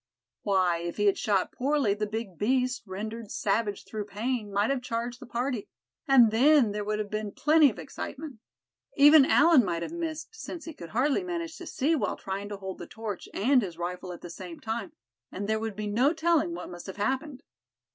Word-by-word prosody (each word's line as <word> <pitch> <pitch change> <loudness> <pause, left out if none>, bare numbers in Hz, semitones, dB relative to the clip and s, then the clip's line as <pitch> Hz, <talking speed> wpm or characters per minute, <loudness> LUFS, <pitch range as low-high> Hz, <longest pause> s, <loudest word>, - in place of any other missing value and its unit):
Why, 185 -4 +2
if 170 0 -5
he 205 - +1
had 200 - +3
shot 200 -3 +1
poorly, 275 -5 +1
the 210 +1 -2
big 215 -3 -5
beast, 255 +3 +1
rendered 215 +3 -6
savage 205 0 -1
through 215 -2 -5
pain, 210 +1 -3
might 205 +5 +1
have 270 -2 -1
charged 240 0 -3
the 255 - -11
party; 240 -2 -2 0.4
and 245 -5 +7
then 260 0 +5
there 210 0 -3
would 210 +1 -1
have 210 -1 -4
been 215 -1 -3
plenty 305 +3 +5
of 220 - -9
excitement. 280 -2 -7 0.6
Even 290 0 +8
Allan 310 -4 +6
might 170 -3 -2
have - - -5
missed, 325 -2 -4
since 445 -6 -8
he 325 - -7
could 170 - -10
hardly 275 - +1
manage 335 -2 -4
to 355 - -8
see 295 +5 0
while 300 - -1
trying 195 +1 -5
to 205 - -5
hold 190 -1 -7
the - - -7
torch, 220 -4 -6
and 255 +5 +3
his 175 -6 -5
rifle 180 +1 -4
at 175 - -9
the 175 - -8
same 175 -1 -9
time; 225 +1 -4 0.4
and 200 +2 -4
there 220 0 +1
would 220 -2 -4
be 215 +1 -4
no 245 +9 +2
telling 320 - +1
what 180 +1 -7
must 175 +1 -9
have 190 - -7
happened. 265 +5 -2
220 Hz, 205 wpm, -28 LUFS, 200-275 Hz, 0.6 s, Even